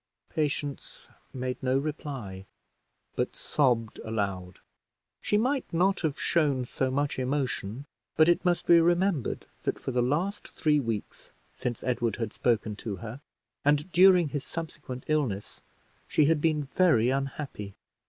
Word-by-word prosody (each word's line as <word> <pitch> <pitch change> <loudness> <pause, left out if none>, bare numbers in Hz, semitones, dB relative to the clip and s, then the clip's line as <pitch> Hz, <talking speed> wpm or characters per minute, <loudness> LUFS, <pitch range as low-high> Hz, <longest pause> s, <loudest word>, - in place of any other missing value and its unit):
Patience 145 -2 -3 0.2
made 130 -1 -4
no 130 0 +2
reply, 135 -10 -5 0.7
but - - -1
sobbed 120 -6 +1
aloud. 100 -4 -3 0.6
She 210 - +1
might 260 +5 0
not 185 +4 +2
have 155 -3 -1
shown 145 -7 +2
so 130 +2 -1
much 140 +1 -1
emotion, 130 -3 -2 0.3
but 155 - +5
it 175 -1 +3
must 175 -1 +1
be 170 -1 +7
remembered 175 - +1 0.2
that - - -1
for - - -4
the 125 -1 +1
last 165 +11 -1
three 150 -1 +1
weeks 115 -6 -4 0.2
since 120 -2 -4
Edward 120 -4 0
had 115 -3 -4
spoken 110 -3 0
to 105 -1 -4
her, 115 +7 -8 0.4
and 150 +4 +2
during 180 -2 +6
his 145 -1 -3
subsequent 145 -6 -6
illness, 135 -10 -1 0.5
she 150 - +3
had 155 0 +3
been 155 -2 +2
very 135 -5 +3
unhappy. 135 -7 -4
140 Hz, 140 wpm, -28 LUFS, 120-160 Hz, 0.7 s, be